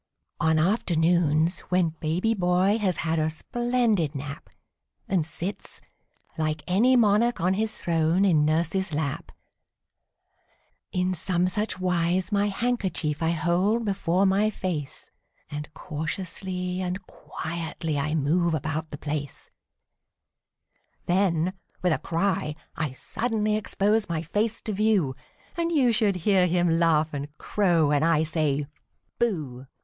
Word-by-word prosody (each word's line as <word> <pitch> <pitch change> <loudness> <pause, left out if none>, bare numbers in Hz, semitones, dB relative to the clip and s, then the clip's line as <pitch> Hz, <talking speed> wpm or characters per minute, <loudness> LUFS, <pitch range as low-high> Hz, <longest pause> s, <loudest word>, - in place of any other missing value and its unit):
On 160 -1 +3
afternoons, 170 -2 +2
when 180 -2 +3
baby 175 +8 0
boy 185 +2 +2
has 185 -6 0
had 165 0 +1
a 155 0 +1
splendid 225 - 0
nap, 140 +1 -7 0.6
And 175 -5 +1
sits, 180 +5 -5 0.6
like 155 -1 -1
any 225 +8 +4
monarch 230 +1 +3
on 180 +3 +2
his 220 +2 -2
throne, 165 +3 +2
in 160 -6 +4
nurse's 165 +4 0
lap, 145 -2 -3 1.6
In 180 0 0
some 180 0 +1
such 210 0 -2
wise 180 +1 +1
my 205 0 +2
handkerchief 195 -9 -1
I 165 - +2
hold 180 +7 +1
before 190 -2 +1
my 200 +3 +3
face, 170 -9 -5 0.4
And 150 0 -6
cautiously 180 +4 -4
and 185 +1 -3
quietly 160 -3 -4
I 150 +3 -1
move 165 +3 +2
about 155 +1 -3
the 145 - -7
place; 145 -1 -5 1.5
Then, 180 -1 +1 0.3
with 180 -2 +3
a - - -1
cry, 165 -3 -1 0.2
I 155 -5 -2
suddenly 215 - -1
expose 210 0 0
my 165 -1 -1
face 210 +7 -1
to 215 - -4
view, 200 -10 +2 0.4
And 335 0 -1
you 270 -7 +4
should 215 -3 +2
hear 190 -3 +4
him 175 -1 +2
laugh 160 -2 +2
and 140 0 -3
crow 175 -7 +2
when 145 -1 +2
I 160 -1 +3
say 150 -3 0 0.5
"Booh"! 150 - -2
175 Hz, 130 wpm, -26 LUFS, 155-200 Hz, 1.6 s, any